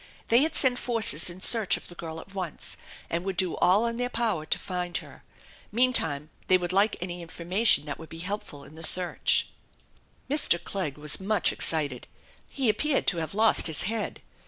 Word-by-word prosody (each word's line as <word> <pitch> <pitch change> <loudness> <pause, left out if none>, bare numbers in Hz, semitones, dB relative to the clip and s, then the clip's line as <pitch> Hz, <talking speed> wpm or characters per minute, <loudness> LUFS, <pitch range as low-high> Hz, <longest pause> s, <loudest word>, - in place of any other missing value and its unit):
They 235 +3 +4
had 315 +2 -1
sent 255 -2 +2
forces 220 - +4
in 175 +2 -10
search 215 -3 +5
of - - -12
the - - -10
girl 165 -1 -8
at 195 +4 -14
once 185 -5 -4 0.3
and 170 +1 -4
would 190 -1 -5
do 185 -2 +1
all 200 +6 +2
in 230 0 -3
their 245 0 -3
power 220 -11 -2
to - - +1
find 180 -1 -4
her. - - -11 0.5
Meantime 165 - 0 0.2
they 185 - +4
would 180 0 -4
like 200 +3 +2
any 175 0 -6
information 170 0 +1
that 145 - -7
would 160 - -12
be 165 - -9
helpful 190 -8 -7
in 150 - -15
the 160 - -12
search. 180 +2 +4 0.8
Mr. 285 - +4
Clegg 170 -8 -5
was 150 0 -1
much 200 0 0
excited. 145 -6 -1 0.4
He 270 -3 -3
appeared 270 +7 0
to 175 - -4
have 165 +2 -5
lost 220 -3 +2
his 160 -2 +3
head. 220 +2 -4
185 Hz, 190 wpm, -26 LUFS, 165-220 Hz, 0.8 s, search